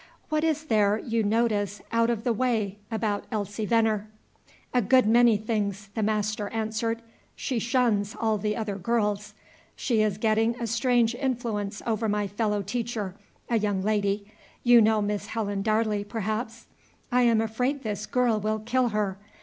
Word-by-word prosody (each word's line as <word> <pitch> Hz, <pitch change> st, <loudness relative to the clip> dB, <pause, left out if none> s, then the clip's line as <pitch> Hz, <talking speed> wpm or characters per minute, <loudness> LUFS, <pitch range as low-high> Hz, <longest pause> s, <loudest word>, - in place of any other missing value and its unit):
"What 310 Hz, -1 st, +1 dB
is 315 Hz, -1 st, +1 dB
there 210 Hz, -7 st, +3 dB
you 225 Hz, 0 st, -1 dB
notice 210 Hz, -2 st, +1 dB
out 230 Hz, 0 st, +3 dB
of 230 Hz, -2 st, -1 dB
the 240 Hz, -2 st, +1 dB
way 215 Hz, -4 st, 0 dB
about 215 Hz, -2 st, -1 dB
Elsie 210 Hz, 0 st, -3 dB
Venner?" 220 Hz, -2 st, +2 dB, 0.7 s
"A 250 Hz, -, +4 dB
good 255 Hz, +4 st, +4 dB
many 230 Hz, 0 st, +5 dB
things," 205 Hz, -2 st, -2 dB
the 225 Hz, -, -2 dB
master 210 Hz, -1 st, 0 dB
answered. 225 Hz, +1 st, -2 dB, 0.3 s
"She 255 Hz, -4 st, -2 dB
shuns 230 Hz, -2 st, +1 dB
all 220 Hz, -2 st, +1 dB
the 210 Hz, +1 st, -1 dB
other 210 Hz, -3 st, -3 dB
girls. 210 Hz, 0 st, -1 dB, 0.4 s
She 230 Hz, -4 st, +1 dB
is 210 Hz, -2 st, +1 dB
getting 225 Hz, +2 st, +1 dB
a 235 Hz, -, -2 dB
strange 235 Hz, 0 st, +2 dB
influence 235 Hz, -6 st, -2 dB
over 225 Hz, -1 st, 0 dB
my 205 Hz, 0 st, 0 dB
fellow 205 Hz, 0 st, -1 dB
teacher, 215 Hz, -2 st, -3 dB, 0.3 s
a 230 Hz, -2 st, +2 dB
young 205 Hz, -3 st, 0 dB
lady, 205 Hz, -1 st, 0 dB, 0.4 s
you 240 Hz, -1 st, +7 dB
know 215 Hz, -1 st, +3 dB
Miss 205 Hz, 0 st, -2 dB
Helen 205 Hz, -3 st, -2 dB
Darley, 215 Hz, -1 st, +1 dB
perhaps? 220 Hz, +2 st, -4 dB, 0.5 s
I 250 Hz, 0 st, +4 dB
am 235 Hz, -2 st, +4 dB
afraid 250 Hz, +5 st, -1 dB
this 210 Hz, -2 st, -3 dB
girl 245 Hz, -4 st, +2 dB
will 215 Hz, +1 st, 0 dB
kill 245 Hz, +2 st, +1 dB
her. 205 Hz, -3 st, -1 dB
220 Hz, 160 wpm, -27 LUFS, 205-235 Hz, 0.7 s, you